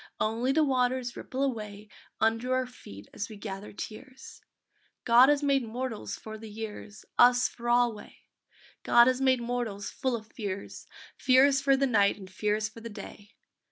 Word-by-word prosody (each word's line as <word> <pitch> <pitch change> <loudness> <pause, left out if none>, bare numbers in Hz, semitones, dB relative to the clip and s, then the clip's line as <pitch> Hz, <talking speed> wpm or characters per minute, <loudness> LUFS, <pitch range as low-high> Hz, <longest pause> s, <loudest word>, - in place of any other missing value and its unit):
Only 230 +4 0
the 310 +3 +3
waters 255 -2 0
ripple 265 +2 -4
away 215 -5 -4 0.3
Under 225 +3 +1
our 255 0 0
feet 100 - -13
as 205 - -5
we 215 - -9
gather 200 -1 -7
tears. 255 +6 -10 0.6
God 245 +3 +7
has 290 0 +2
made 275 -1 +3
mortals 235 0 -5
for 220 0 -9
the 220 0 -9
years, 210 -1 -8
Us 245 +1 +6
for 240 0 -6
alway! 240 -3 0 0.6
God 235 0 +6
has 255 +1 +1
made 260 -2 +3
mortals 235 -4 -3
full 260 -3 -1
of 220 -2 -7
fears, 200 -3 -6 0.3
Fears 270 +1 +4
for 275 -1 +3
the 275 - +2
night 205 -6 +3
and 190 -2 -12
fears 210 +2 -1
for 220 +2 -13
the 230 - -7
day. 205 0 -11
235 Hz, 165 wpm, -28 LUFS, 210-255 Hz, 0.6 s, God